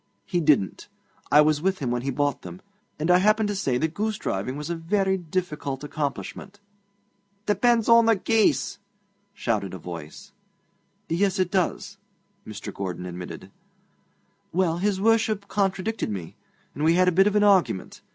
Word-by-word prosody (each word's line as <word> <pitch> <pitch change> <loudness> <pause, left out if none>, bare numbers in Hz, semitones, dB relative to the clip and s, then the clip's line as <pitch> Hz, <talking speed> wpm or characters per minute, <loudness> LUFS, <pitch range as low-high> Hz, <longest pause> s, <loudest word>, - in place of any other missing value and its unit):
He 175 - -1
didn't. 145 - +1 0.4
I 150 - +8
was 150 -1 +2
with 190 +2 +1
him 130 -7 -3
when 120 0 -1
he 135 - -3
bought 145 +2 -1
them, 180 - -9 0.4
and 160 +4 +1
I 180 - +6
happened 215 +2 +3
to 205 - -2
say 135 -10 0
that 160 +4 -1
goosedriving 165 - -2
was 150 +3 -5
a - - -1
very 190 +3 0
difficult 155 -6 -4
accomplishment.' 150 +7 -5 0.9
'Depends 225 +2 +2
on 230 -1 +6
the 225 - +5
geese!' 220 +3 +1 0.6
shouted 100 -5 -2
a - - -6
voice. 85 -3 -9 0.8
'Yes, 190 +4 +1
it 185 -1 0
does,' 185 -4 -1 0.5
Mr. 105 -1 -7
Gordon 90 -2 -5
admitted. 90 0 -8 1.0
'Well, 175 -2 +1
his 200 0 0
Worship 215 -1 +2
contradicted 195 - -1
me, 95 -6 -6 0.4
and 145 - -4
we 165 +2 +4
had 185 +1 +4
a - - +5
bit 195 +3 +4
of 210 - 0
an 210 - +4
argument. 190 - +2
175 Hz, 160 wpm, -25 LUFS, 135-200 Hz, 1.0 s, I